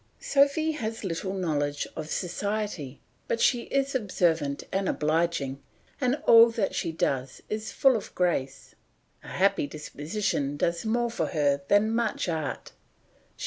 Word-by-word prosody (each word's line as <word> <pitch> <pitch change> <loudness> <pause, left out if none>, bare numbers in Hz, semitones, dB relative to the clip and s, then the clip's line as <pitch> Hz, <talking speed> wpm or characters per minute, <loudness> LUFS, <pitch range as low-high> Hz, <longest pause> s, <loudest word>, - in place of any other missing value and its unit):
Sophy 285 +3 +2
has 225 -7 -4
little 190 +1 -3
knowledge 145 -5 -1
of 155 0 -6
society, 185 -6 -3 0.3
but 230 - -1
she 240 -1 +2
is 275 0 0
observant 165 - 0
and 195 0 0
obliging, 150 -3 0 0.4
and 255 0 +2
all 230 0 +8
that 225 -4 -1
she 165 - -2
does 135 -5 -2
is 215 0 -3
full 270 -2 +4
of 220 - -5
grace. 140 -7 -1 0.5
A - - -13
happy 195 -5 +1
disposition 150 0 -3
does 170 +4 -1
more 235 +1 +1
for - - -1
her 145 -3 +1
than 210 +2 +3
much 230 -4 0
art. 160 -4 -3
185 Hz, 140 wpm, -27 LUFS, 150-225 Hz, 0.5 s, all